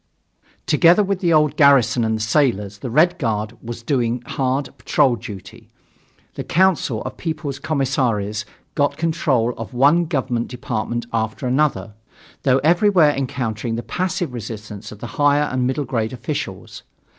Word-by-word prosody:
Together 170 +6 +5
with 195 -1 -1
the 175 -3 +1
old 150 -2 +3
garrison 135 -5 +4
and 110 0 0
the 110 - -3
sailors, 110 -5 +1
the 125 - -5
Red 165 +8 +3
Guard 110 -4 -2
was 120 0 -7
doing 120 -2 0
hard 135 +2 -1
patrol 135 -5 +2
duty. 100 -6 -10 0.6
The - - -5
Council 170 - +1
of - - -7
People's 155 -4 -4
Commissaries 125 -8 -1 0.3
got 145 -2 0
control 140 -8 +1
of 115 +3 -7
one 145 +7 +4
government 130 -7 -1
department 120 -1 -3
after 110 +3 -2
another, 130 -4 0 0.5
though 130 -1 +3
everywhere 170 -1 +4
encountering 120 -4 -3
the 120 - -4
passive 180 -5 -2
resistance 105 -2 -7
of 105 0 -12
the - - -5 0.2
higher 145 0 +4
and 130 -3 -1
middle 135 +2 -1
grade 115 -2 -2
officials. 120 -3 -5
130 Hz, 145 wpm, -20 LUFS, 115-150 Hz, 0.6 s, Together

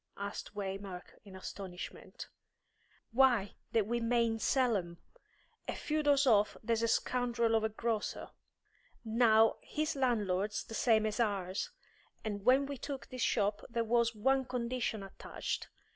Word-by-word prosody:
asked 200 +1 -6
Waymark, 195 -2 -5 0.2
in 195 -2 -11
astonishment. 185 -1 -8 0.8
"Why, 235 -5 +4 0.2
that 225 -3 +2
we 235 +3 -1
mayn't 230 -1 +1
sell 250 -2 +3
'em! 170 -3 -3 0.7
A - - -2
few 310 0 -1
doors 285 -1 +4
off 210 -5 +4
there's 230 0 +1
a 230 - +2
scoundrel 235 -1 +1
of 220 -1 +3
a 220 - +1
grocer. 220 0 -3 0.7
Now, 225 -1 +4
his 310 +1 -2
landlord's 210 -6 0
the - - -10
same 220 -1 +3
as 215 +1 -2
ours, 200 - 0 0.5
and 205 -2 -3
when 260 +4 +5
we 280 0 -5
took 270 -3 -6
this 255 -1 -6
shop 205 -2 +1
there 235 -1 0
was 235 0 +2
one 265 +5 +2
condition 240 -3 -2
attached. 195 - -5
225 Hz, 145 wpm, -33 LUFS, 205-245 Hz, 0.8 s, when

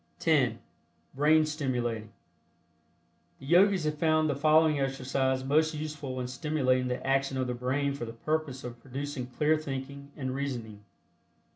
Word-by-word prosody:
(10) - - +2 0.6
BRAIN 155 +3 +4
STIMULATING. 120 -8 -2 1.3
The 135 - -13
Yogis 185 +3 +4
have 150 -1 -2
found 155 -1 +3
the - - -2
following 155 +1 +4
exercise 135 -1 0
most 155 +3 +2
useful 150 -4 -5
in 125 - -3
stimulating 130 -2 0
the 125 0 -3
action 135 0 +1
of 130 - 0
the 125 - -2
brain 135 +3 -1
for 140 -4 -5
the 115 - -7
purpose 150 +1 -2
of 120 -1 -8
producing 135 0 -5
clear 150 +5 +2
thinking 140 -1 -6
and 130 -3 -3
reasoning. 120 -7 -5
135 Hz, 145 wpm, -29 LUFS, 130-155 Hz, 1.3 s, BRAIN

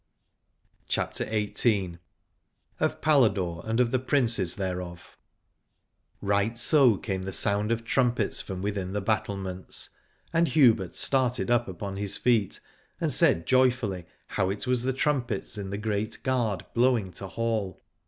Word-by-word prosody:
io8 - - -45
CHAPTER - - -1
XVIII. 105 -4 0 0.8
OF - - -1
PALADORE 100 - +2
AND 110 +1 -1
OF 120 -2 +2
THE 130 - +1
PRINCES 120 - +1
THEREOF. 90 -2 -5 1.1
Right 100 +3 0
so 125 -3 +5
came 95 -3 -4
the 95 +1 -5
sound 100 +5 +2
of 115 0 -1
trumpets 120 -3 +1
from 95 -1 -6
within 100 -2 -3
the 105 - -1
battlements: 95 -3 -2 0.4
and 165 +1 +3
Hubert 115 - +3
started 125 -2 +1
up 120 0 +2
upon 95 +1 -6
his 100 0 +1
feet 115 -6 +1 0.4
and - - +1
said 85 - +3
joyfully 125 -9 +1 0.2
how 95 - -1
it 100 +1 -3
was 125 -1 +1
the 130 +2 0
trumpets 130 -7 -1
in 100 -2 -5
the 100 - -4
Great 105 +1 -3
Gard 120 -8 -1
blowing 120 -5 +2
to 95 - -7
hall. 110 -2 -3
105 Hz, 145 wpm, -27 LUFS, 95-120 Hz, 1.1 s, so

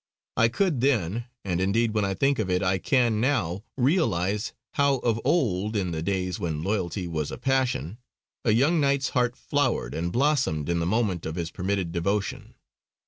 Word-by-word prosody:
I 115 - +4
could 150 +1 0
then, 115 -4 +1 0.2
and 90 -2 -1
indeed 110 +4 +1
when 105 -1 +1
I 95 0 -1
think 135 +4 +2
of 105 -4 -1
it 90 +1 +1
I 95 0 +1
can 120 -2 +2
now, 105 - 0
realise 105 - +1 0.2
how 140 -1 +3
of 115 -3 0
old, 110 - +1
in 95 -4 0
the 80 -1 -3
days 90 0 -1
when 80 -3 -2
loyalty 95 -2 -1
was 80 -3 -2
a - - -6
passion, 130 -6 0 0.4
a - - +1
young 140 +10 +3
knight's 140 0 +2
heart 125 -1 +1
flowered 145 -4 -1
and 85 +1 -2
blossomed 125 - +1
in 85 0 +1
the 85 - -1
moment 100 -5 0
of 80 - -4
his 85 -1 -3
permitted 95 -2 -2
devotion. 100 +4 -2
105 Hz, 180 wpm, -26 LUFS, 90-130 Hz, 0.4 s, I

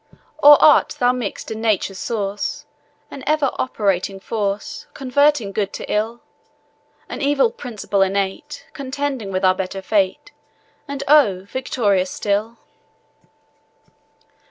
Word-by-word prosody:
Or 290 0 +9
art 300 - +5
thou 245 0 +3
mix'd 245 -5 -5
in 220 0 -5
Nature's 200 -4 0
source, 205 -3 -3 0.5
An 270 - -9
ever 300 -3 +2
operating 195 -5 -1
force, 205 -1 -4
Converting 275 -4 +2
good 200 -1 -2
to - - -6
ill; 225 +3 -1 0.9
An - - -6
evil 280 -4 +2
principle 210 -5 -3
innate, 195 +9 -2
Contending 270 -5 -4
with 185 0 0
our 185 - +5
better 190 +1 -5
fate, 195 -2 0 0.6
And, 280 0 -5
oh! 265 -11 +5
victorious 205 -5 0
still? 210 +4 -2
220 Hz, 115 wpm, -20 LUFS, 195-265 Hz, 0.9 s, Or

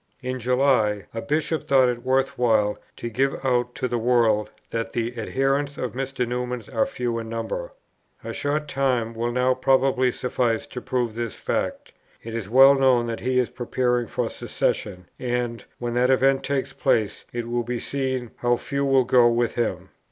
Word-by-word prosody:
In 130 0 -3
July, 120 -5 +2
a 115 - -3
Bishop 155 +2 -1
thought 135 -3 +5
it 120 -1 -2
worth 130 +1 +1
while 110 -4 +2 0.2
to - - -5
give 135 +4 0
out 125 -1 +1
to 130 -2 -1
the 120 -1 -1
world 115 -3 +2 0.2
that 115 0 -3
"the 120 +1 -2
adherents 135 +5 -1
of 125 - -3
Mr. 130 -1 -2
Newman 125 0 -3
are 275 - +2
few 120 - -2
in 110 -1 -6
number. 115 - -4 0.5
A - - -5
short 150 +1 -1
time 125 -5 0
will 115 +1 -2
now 125 +1 +2
probably 130 0 +2
suffice 120 -2 -1
to 125 - -7
prove 120 -3 -1
this 115 -1 -4
fact. - - -3 0.3
It 115 - -7
is 115 -4 -4
well 135 +3 +8
known 130 -3 +3
that 115 -1 -4
he 130 +1 0
is 125 -2 +1
preparing 125 -1 0
for - - -2
secession; 90 -3 -2
and, 120 -2 -2
when 120 -1 -3
that 125 +1 +2
event 135 +1 +3
takes 140 -2 -2
place, 105 -2 0
it 120 -1 -4
will 120 0 0
be 120 +1 -3
seen 130 -2 -2
how 120 0 +2
few 140 +3 -2
will 135 -2 +3
go 125 -1 +5
with 120 0 +1
him." 120 - -2
125 Hz, 180 wpm, -24 LUFS, 115-130 Hz, 0.5 s, well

